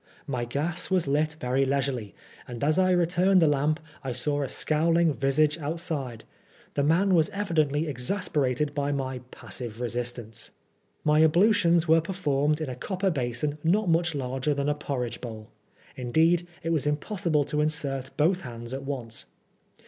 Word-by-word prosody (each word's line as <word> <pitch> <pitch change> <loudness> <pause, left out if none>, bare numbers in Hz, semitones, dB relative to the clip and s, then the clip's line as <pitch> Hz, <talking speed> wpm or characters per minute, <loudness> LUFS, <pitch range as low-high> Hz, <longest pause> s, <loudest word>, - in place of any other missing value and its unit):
My 125 -4 -2
gas 150 +8 -2
was 185 -5 +2
lit 155 +3 +1
very 125 +2 +1
leisurely, 135 -6 -1 0.3
and 120 0 -6
as 155 +5 +3
I 185 0 +4
returned 180 +2 +3
the 165 - +5
lamp 150 +2 +2 0.2
I 130 -2 -3
saw 145 +4 0
a 135 - -2
scowling 165 +1 +2
visage 145 +4 +2
outside 145 -7 -3 0.5
The 145 - 0
man 175 +7 +3
was 160 -3 +4
evidently 160 -7 0
exasperated 145 -2 -1
by 145 0 -1
my 130 -2 -2
"passive 120 -4 -7
resistance/' 120 -2 -4 0.5
My 150 0 +4
ablutions 170 0 +4
were 160 +1 +5
performed 150 -4 0
in 155 - -2
a - - -5
copper 190 +8 -1
basin 140 +2 -2
not 190 +4 +2
much 165 0 +2
larger 130 +2 -1
than 140 +1 0
a - - +3
porridge 135 -5 -4
bowl; 110 -2 -8 0.5
indeed, 160 +7 +2 0.2
it 165 - -1
was 150 -3 +1
impossible 155 0 0
to 150 +2 -1
insert 140 -3 -1
both 175 +5 +2
hands 120 0 -7
at 135 - -4
once. 130 -5 -4
150 Hz, 155 wpm, -27 LUFS, 130-165 Hz, 0.5 s, the